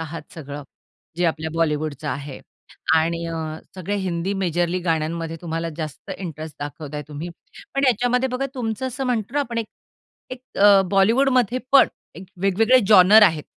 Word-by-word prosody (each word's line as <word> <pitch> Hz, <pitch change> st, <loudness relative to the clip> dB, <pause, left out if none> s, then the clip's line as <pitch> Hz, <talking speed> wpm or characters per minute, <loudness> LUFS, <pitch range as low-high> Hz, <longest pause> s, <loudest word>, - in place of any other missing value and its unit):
आहात 160 Hz, 0 st, -6 dB
सगळं 145 Hz, -2 st, -7 dB, 0.5 s
जे 175 Hz, -, 0 dB
आपल्या 160 Hz, -1 st, -1 dB
बॉलिवूडच 155 Hz, -3 st, -1 dB
आहे 145 Hz, -2 st, -5 dB, 0.5 s
आणि 165 Hz, +1 st, +1 dB
अ, 165 Hz, -, -4 dB, 0.4 s
सगळ्या 190 Hz, +3 st, -3 dB
हिंदी 185 Hz, 0 st, -2 dB
मेजरली 175 Hz, -1 st, 0 dB
गाण्यांमध्ये 165 Hz, 0 st, -2 dB
तुम्हाला 165 Hz, 0 st, -3 dB
जास्त 155 Hz, +3 st, -7 dB
इंटरेस्ट 160 Hz, -4 st, -7 dB
दाखवताय 150 Hz, 0 st, -6 dB
तुम्ही, 150 Hz, +3 st, -6 dB, 0.5 s
पण 275 Hz, +1 st, +1 dB
याच्यामध्ये 245 Hz, +2 st, +2 dB
बघा 255 Hz, +2 st, -2 dB
तुमचं 240 Hz, 0 st, -3 dB
असं 260 Hz, +2 st, -4 dB
म्हणतो 235 Hz, 0 st, -2 dB
ना 290 Hz, -, +2 dB
आपण 235 Hz, -4 st, -3 dB
एक, 225 Hz, -, -2 dB, 0.6 s
एक 255 Hz, -1 st, -7 dB, 0.2 s
अ, 200 Hz, -1 st, +7 dB
बॉलिवूडमध्ये 245 Hz, +4 st, +3 dB
पण 275 Hz, -, +7 dB, 0.5 s
वेगवेगळे 220 Hz, +6 st, +4 dB
जॉनर 210 Hz, +1 st, +8 dB
आहेत 160 Hz, -6 st, +4 dB
180 Hz, 145 wpm, -22 LUFS, 160-225 Hz, 0.6 s, जॉनर